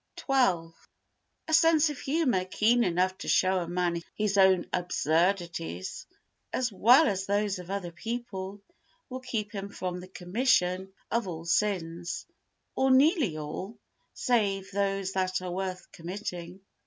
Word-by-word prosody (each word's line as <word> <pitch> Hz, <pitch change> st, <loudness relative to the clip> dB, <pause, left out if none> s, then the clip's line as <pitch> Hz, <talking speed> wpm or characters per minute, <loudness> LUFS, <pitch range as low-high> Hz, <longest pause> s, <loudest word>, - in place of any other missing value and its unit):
xii 190 Hz, -12 st, +2 dB, 0.8 s
A 315 Hz, -, -2 dB
sense 320 Hz, -1 st, +5 dB
of 290 Hz, -, -8 dB
humour 270 Hz, -, +1 dB
keen 230 Hz, +6 st, +3 dB
enough 185 Hz, 0 st, +1 dB
to -, -, -7 dB
show 185 Hz, 0 st, +3 dB
a 175 Hz, -, -4 dB
man 175 Hz, -1 st, -1 dB
his 210 Hz, -1 st, 0 dB
own 190 Hz, -2 st, +5 dB
absurdities, 170 Hz, -, -1 dB, 0.4 s
as 245 Hz, -2 st, 0 dB
well 245 Hz, +10 st, +6 dB
as 195 Hz, -3 st, -1 dB
those 200 Hz, -1 st, 0 dB
of 180 Hz, 0 st, -10 dB
other 195 Hz, -3 st, -3 dB
people, 205 Hz, 0 st, -5 dB, 0.5 s
will 255 Hz, 0 st, -5 dB
keep 225 Hz, -5 st, -3 dB
him 200 Hz, -2 st, -5 dB
from 180 Hz, -2 st, -4 dB
the 180 Hz, -, -10 dB
commission 185 Hz, -1 st, +1 dB, 0.2 s
of 235 Hz, -3 st, 0 dB
all 165 Hz, -2 st, -6 dB
sins, 170 Hz, -2 st, -1 dB, 0.5 s
or 265 Hz, -, +2 dB
nearly 265 Hz, -, +4 dB
all, 155 Hz, +8 st, -6 dB, 0.4 s
save 200 Hz, -6 st, 0 dB
those 195 Hz, -1 st, -1 dB
that 185 Hz, -1 st, 0 dB
are 180 Hz, -1 st, -5 dB
worth 185 Hz, 0 st, -4 dB
committing. 180 Hz, 0 st, -6 dB
190 Hz, 140 wpm, -28 LUFS, 180-230 Hz, 0.8 s, well